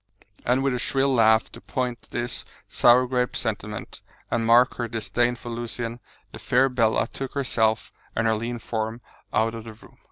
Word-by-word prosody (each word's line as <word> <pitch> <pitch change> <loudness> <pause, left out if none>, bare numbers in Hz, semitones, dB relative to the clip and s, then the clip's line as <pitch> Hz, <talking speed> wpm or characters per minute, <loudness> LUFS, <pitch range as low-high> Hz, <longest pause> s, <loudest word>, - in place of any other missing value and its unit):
And 125 +2 +3
with 135 -2 +1
a 125 - -1
shrill 135 +2 +1
laugh 110 -2 +4
to - - -12
point 125 -2 -3
this 120 0 -3 0.2
sour 125 +1 +5
grape 125 -1 0
sentiment, 105 -1 -4 0.3
and 115 - +1
mark 120 +2 +5
her 120 - -2
disdain 120 +2 0
for 120 - -9
Lucian, 120 0 -4 0.3
the - - -9
fair 130 +2 +3
Bella 115 -3 +2
took 135 +1 -7
herself 110 -5 +1 0.2
and 115 - +1
her 110 - +3
lean 115 +2 -3
form 110 0 -3 0.3
out 110 +1 +1
of 115 -1 -6
the 110 - -8
room. 110 - -19
120 Hz, 180 wpm, -25 LUFS, 110-125 Hz, 0.3 s, sour